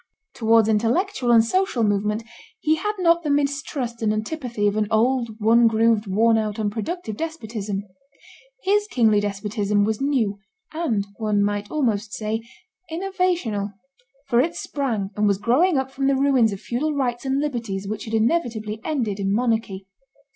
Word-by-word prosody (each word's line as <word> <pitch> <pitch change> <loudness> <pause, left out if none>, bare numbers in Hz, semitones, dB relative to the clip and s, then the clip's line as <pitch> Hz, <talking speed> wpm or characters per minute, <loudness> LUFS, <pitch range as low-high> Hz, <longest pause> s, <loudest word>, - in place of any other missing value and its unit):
Towards 225 -1 +3
intellectual 240 - +1
and 230 -1 +6
social 370 -4 +1
movement 210 +1 0 0.4
he 310 - +2
had 420 +5 -1
not 340 -2 +3
the 305 - -3
mistrust 280 -4 -1
and 215 -1 +2
antipathy 225 0 -2
of 205 0 +2
an 215 -1 +1
old, 230 0 +1
one 230 +2 +5
grooved, 225 -1 +2
worn 225 +4 +3
out, 215 -1 -3
unproductive 220 - -3
despotism; 220 -10 -4 0.8
his 415 +2 +2
kingly 220 - +3
despotism 205 0 0
was 215 +2 -1
new, 240 -8 0 0.3
and, 240 -12 -1
one 210 -2 +1
might 205 0 -2
almost 225 -8 -1
say, 220 +1 -2 0.5
innovational, 345 - -1 0.5
for 240 -3 +3
it 330 +6 +1
sprang 230 -9 -2
and 210 0 +2
was 200 -1 +2
growing 275 - +3
up 265 0 -1
from 270 0 -1
the 275 - +3
ruins 265 -5 +3
of 200 - -5
feudal 290 +8 -2
rights 245 -3 -1
and 270 0 0
liberties 230 -9 -3
which 215 +1 -4
had 225 0 -3
inevitably 220 -4 0
ended 235 -10 -2
in 195 0 0
monarchy. 220 -4 0
230 Hz, 155 wpm, -23 LUFS, 210-275 Hz, 0.8 s, and